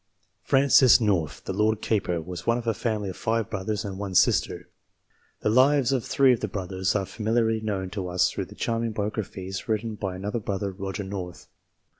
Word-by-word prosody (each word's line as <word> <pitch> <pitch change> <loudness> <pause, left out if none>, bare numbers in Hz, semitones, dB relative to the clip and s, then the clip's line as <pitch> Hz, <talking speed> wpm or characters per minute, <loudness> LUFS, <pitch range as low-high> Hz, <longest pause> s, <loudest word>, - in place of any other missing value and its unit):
Francis 135 -2 +5
North, 95 -9 0
the - - -3
Lord 110 0 +1
Keeper, 90 -7 -1
was 85 +1 -8
one 115 +1 +3
of 120 - -5
a 115 - +1
family 105 -3 -2
of 90 - -6
five 115 -1 -1
brothers 105 +2 -3
and 95 -1 -5
one 100 -2 -4
sister. 90 -4 +2 0.7
The - - +1
lives 130 +2 +4
of 130 -4 0
three 135 -2 +4
of 120 - -1
the - - -2
brothers 95 0 -2
are 100 -2 +1
familiarly 110 +2 0
known 95 -4 -3
to 95 -3 -4
us 90 0 +2
through - - -4
the - - -14
charming 115 -1 -1
biographies 100 -2 -4
written 110 +1 -1
by 95 -3 -4
another 105 +5 -3
brother, 100 -1 -3
Roger 95 +1 -5
North. 95 -3 -7
105 Hz, 190 wpm, -26 LUFS, 95-115 Hz, 0.7 s, Francis